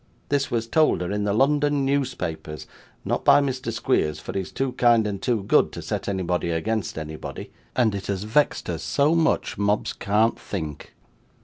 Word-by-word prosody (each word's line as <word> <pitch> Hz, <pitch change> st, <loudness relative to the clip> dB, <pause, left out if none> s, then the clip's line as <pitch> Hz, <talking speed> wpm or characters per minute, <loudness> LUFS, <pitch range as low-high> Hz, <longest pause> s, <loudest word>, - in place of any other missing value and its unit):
This 140 Hz, -1 st, +1 dB
was 115 Hz, -1 st, -1 dB
told 155 Hz, -, +2 dB
her 90 Hz, -, -3 dB
in 105 Hz, 0 st, -1 dB
the 100 Hz, -, +1 dB
London 145 Hz, +4 st, +2 dB
newspapers 90 Hz, -, -2 dB, 0.4 s
not -, -, -1 dB
by -, -, +7 dB
Mr. 130 Hz, -4 st, -2 dB
Squeers, 110 Hz, -, 0 dB
for -, -, -7 dB
he 100 Hz, -, -1 dB
is 95 Hz, -, -6 dB
too 135 Hz, -1 st, -1 dB
kind 120 Hz, -3 st, +4 dB
and 100 Hz, -2 st, -3 dB
too 115 Hz, -3 st, 0 dB
good -, -, +3 dB
to -, -, -6 dB
set -, -, -3 dB
anybody 90 Hz, -3 st, -1 dB
against 90 Hz, +3 st, -2 dB
anybody 80 Hz, 0 st, -7 dB, 0.2 s
and 115 Hz, -4 st, +3 dB
it 100 Hz, -1 st, -5 dB
has 100 Hz, -1 st, -2 dB
vexed 125 Hz, +8 st, +1 dB
her -, -, -3 dB
so 145 Hz, +3 st, +2 dB
much, 165 Hz, -9 st, +1 dB
Mobbs 105 Hz, +1 st, +1 dB
can't 105 Hz, +3 st, +1 dB
think. 80 Hz, -7 st, -6 dB
110 Hz, 185 wpm, -24 LUFS, 95-135 Hz, 0.4 s, by